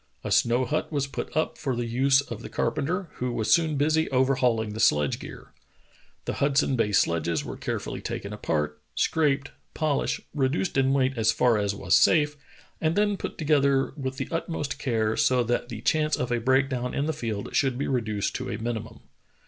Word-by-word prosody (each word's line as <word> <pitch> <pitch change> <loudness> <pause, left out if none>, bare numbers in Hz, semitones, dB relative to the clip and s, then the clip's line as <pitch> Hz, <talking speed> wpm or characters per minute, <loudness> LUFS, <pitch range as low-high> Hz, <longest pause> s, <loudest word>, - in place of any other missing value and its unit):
A - - -4
snow 120 +2 +3
hut 155 +3 -2
was 140 -3 0
put 140 - -5
up 155 - -1
for 135 -5 -1
the 120 0 -2
use 135 +4 +3
of 115 -6 -8
the - - -8
carpenter, 160 +9 -2
who 125 0 -2
was 110 -2 +2
soon 160 -3 +2
busy 155 +3 +2
overhauling 125 -5 +1
the 110 - -6
sledge 75 - +3
gear. - - -11 0.7
The - - -2
Hud 140 -1 +2
son 140 -2 +3
Bay 115 -3 +1
sledges 85 -4 +1
were - - -6
carefully - - -4
taken 100 +1 -5
apart, 75 -7 -2
scraped, 145 -3 +1 0.2
polished, 155 -3 0
reduced 145 +5 0
in 135 0 +3
weight 135 -1 +2
as 110 0 +3
far 115 -2 +2
as 100 0 -1
was - - +2
safe, 150 -2 +4 0.5
and 160 +1 +1
then 205 0 +2
put - - -6
together 140 -3 +2
with 135 -2 -4
the - - -3
utmost 165 -4 -3
care 110 -4 0
so 125 -1 +3
that 120 +1 -1
the 115 -3 -6
chance 155 +4 +2
of 125 -1 -3
a 120 - +1
break 130 +3 +3
down 125 -2 -3
in 140 - 0
the 160 - -1
field 110 -8 -4
should 135 -3 +2
be 140 - -2
reduced 110 -6 -1
to - - -5
a - - -3
mini 115 0 -2
mum. 110 - -12
130 Hz, 200 wpm, -26 LUFS, 115-145 Hz, 0.7 s, safe